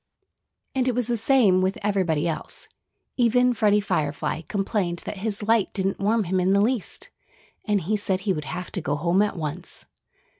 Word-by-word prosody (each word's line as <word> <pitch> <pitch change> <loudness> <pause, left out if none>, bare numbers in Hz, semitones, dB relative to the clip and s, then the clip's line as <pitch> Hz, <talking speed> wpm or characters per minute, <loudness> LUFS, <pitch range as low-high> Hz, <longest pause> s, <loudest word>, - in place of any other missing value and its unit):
And 260 -1 +1
it 250 - +1
was 250 -1 +1
the 240 +1 0
same 225 -5 +4
with 190 +1 0
everybody 180 -6 +1
else. 160 - -4 0.5
Even 245 +1 +4
Freddie 210 -2 +3
Firefly 160 -5 -1
complained 195 -3 -1
that 210 - -5
his 205 +1 -2
light 225 -1 +2
didn't 195 0 -1
warm 215 +3 +2
him 185 +1 0
in 185 +1 +2
the 200 - +4
least. 230 -1 -1 0.5
And 210 -3 +1
he 210 +6 0
said 190 -2 0
he 195 0 +1
would 150 -3 -4
have 180 +6 -5
to 185 - -3
go 145 -1 -1
home 170 +6 +2
at 210 -3 0
once. 160 +2 -4
195 Hz, 185 wpm, -24 LUFS, 180-220 Hz, 0.5 s, same